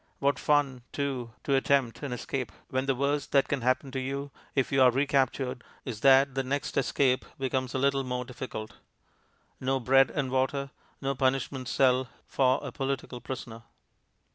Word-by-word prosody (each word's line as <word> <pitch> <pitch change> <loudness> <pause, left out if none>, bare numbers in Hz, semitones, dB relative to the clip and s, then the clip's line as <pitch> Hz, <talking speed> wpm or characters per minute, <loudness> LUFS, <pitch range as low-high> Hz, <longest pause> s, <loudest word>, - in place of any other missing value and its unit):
What 140 -1 +1
fun, 145 -4 +2
too, 130 -5 -3
to 140 - 0
attempt 135 -3 +2
an 145 -3 -4
escape, 125 +1 -3 0.2
when 130 +1 -1
the 135 - +2
worst 140 +2 -1
that 140 -1 +4
can 140 -3 -1
happen 130 +2 +1
to 130 - -2
you, 140 +2 -4 0.2
if 135 -2 +1
you 135 -1 +3
are 130 - +8
recaptured, 130 -1 0 0.2
is 115 -5 -5
that 135 +1 +6
the 135 - 0
next 135 +2 -3
escape 130 0 +2
becomes 130 -1 -2
a - - +2
little 135 0 +2
more 125 -1 -3
difficult. 120 -3 -7 0.8
No 135 +1 0
bread 135 +2 +5
and 135 -4 -2
water, 135 +1 0 0.3
no 135 0 +1
punishment 130 0 0
cell 130 -1 +3 0.2
for 130 -1 +2
a 140 - -5
political 135 -2 -3
prisoner. 120 -2 -7
135 Hz, 165 wpm, -29 LUFS, 130-140 Hz, 0.8 s, are